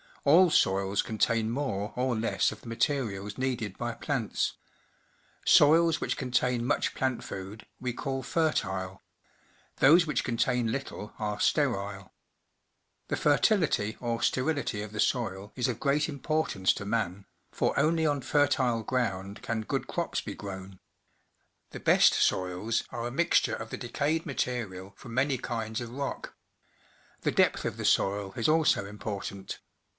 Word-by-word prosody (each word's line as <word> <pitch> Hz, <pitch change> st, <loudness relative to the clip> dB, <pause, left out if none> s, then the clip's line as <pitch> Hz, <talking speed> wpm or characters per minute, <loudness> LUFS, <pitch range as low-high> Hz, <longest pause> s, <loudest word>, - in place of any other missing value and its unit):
All 170 Hz, +6 st, +6 dB
soils 95 Hz, -2 st, +2 dB
contain 110 Hz, 0 st, +1 dB
more 110 Hz, -5 st, -2 dB
or 125 Hz, 0 st, 0 dB
less 110 Hz, +1 st, +1 dB
of -, -, -10 dB
the -, -, -13 dB
materials 115 Hz, -5 st, -1 dB
needed 120 Hz, -7 st, -2 dB
by 120 Hz, -1 st, -3 dB
plants. 120 Hz, -4 st, -1 dB, 0.9 s
Soils 160 Hz, +1 st, +6 dB
which -, -, -1 dB
contain 125 Hz, -2 st, 0 dB
much -, -, 0 dB
plant 130 Hz, -2 st, -1 dB
food 95 Hz, +3 st, -7 dB
we 125 Hz, -1 st, -3 dB
call 135 Hz, +1 st, -3 dB
fertile; 95 Hz, -, -1 dB, 0.8 s
those 165 Hz, +6 st, +6 dB
which 150 Hz, -6 st, -1 dB
contain 120 Hz, 0 st, 0 dB
little 115 Hz, -5 st, -5 dB
are 105 Hz, -1 st, -3 dB
sterile. 100 Hz, -8 st, 0 dB, 0.9 s
The -, -, -1 dB
fertility 150 Hz, -, +2 dB
or 120 Hz, -1 st, -2 dB
sterility 130 Hz, -6 st, 0 dB
of 105 Hz, -, -8 dB
the 110 Hz, -, -7 dB
soil 100 Hz, -5 st, -1 dB
is 125 Hz, 0 st, 0 dB
of 125 Hz, -, -3 dB
great 145 Hz, +2 st, +1 dB
importance 140 Hz, -, 0 dB
to 105 Hz, -, -6 dB
man, 100 Hz, -3 st, -2 dB, 0.3 s
for -, -, 0 dB
only 160 Hz, +2 st, +2 dB
on 145 Hz, -2 st, +1 dB
fertile 130 Hz, -4 st, +2 dB
ground 100 Hz, -5 st, -2 dB
can 115 Hz, -1 st, -2 dB
good 110 Hz, -, -3 dB
crops -, -, -2 dB
be -, -, -6 dB
grown. 95 Hz, -2 st, -8 dB, 0.9 s
The -, -, -7 dB
best -, -, +5 dB
soils 95 Hz, +5 st, 0 dB
are 120 Hz, -1 st, -4 dB
a -, -, -5 dB
mixture 170 Hz, +6 st, +2 dB
of 115 Hz, -, -7 dB
the -, -, -4 dB
decayed 150 Hz, +6 st, -1 dB
material 110 Hz, -9 st, -3 dB
from 115 Hz, -1 st, -9 dB
many 135 Hz, +1 st, +2 dB
kinds 110 Hz, -2 st, -3 dB
of 120 Hz, -1 st, -6 dB
rock. 140 Hz, +2 st, -5 dB, 0.9 s
The -, -, +1 dB
depth -, -, +2 dB
of -, -, -3 dB
the -, -, -4 dB
soil 100 Hz, 0 st, +1 dB
is 115 Hz, -, 0 dB
also 155 Hz, -10 st, +3 dB
important 100 Hz, -1 st, -6 dB
120 Hz, 145 wpm, -29 LUFS, 105-140 Hz, 0.9 s, All